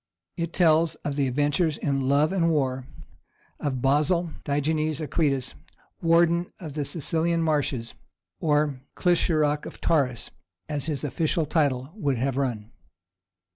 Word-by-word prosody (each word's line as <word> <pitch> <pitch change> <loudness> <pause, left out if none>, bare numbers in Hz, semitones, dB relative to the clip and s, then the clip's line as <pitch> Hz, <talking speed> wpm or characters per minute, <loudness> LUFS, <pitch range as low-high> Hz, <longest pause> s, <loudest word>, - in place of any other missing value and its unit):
It 170 -1 -3
tells 165 -2 +3
of 145 - -1
the 140 -2 +1
adventures 145 +4 +1
in 135 -2 -1
love 145 +5 +3
and 170 -3 +2
war 130 -4 0 0.7
of 130 -4 -2
Basil 155 +5 +2
Digenes 155 +1 0
Akritas, 140 -4 0 0.5
warden 170 +1 +3
of 155 -5 -7
the 150 0 -2
Cilician 165 +2 0
Marches, 140 -7 -1 0.5
or 150 -5 +1
"Clissurarch 155 -4 +2
of - - -11
Taurus," 125 - 0 0.4
as 145 -2 -3
his 145 -5 -2
official 155 +3 0
title 140 -4 0
would 145 - 0
have 130 +2 -1
run. 120 -5 -2
150 Hz, 130 wpm, -26 LUFS, 135-165 Hz, 0.7 s, tells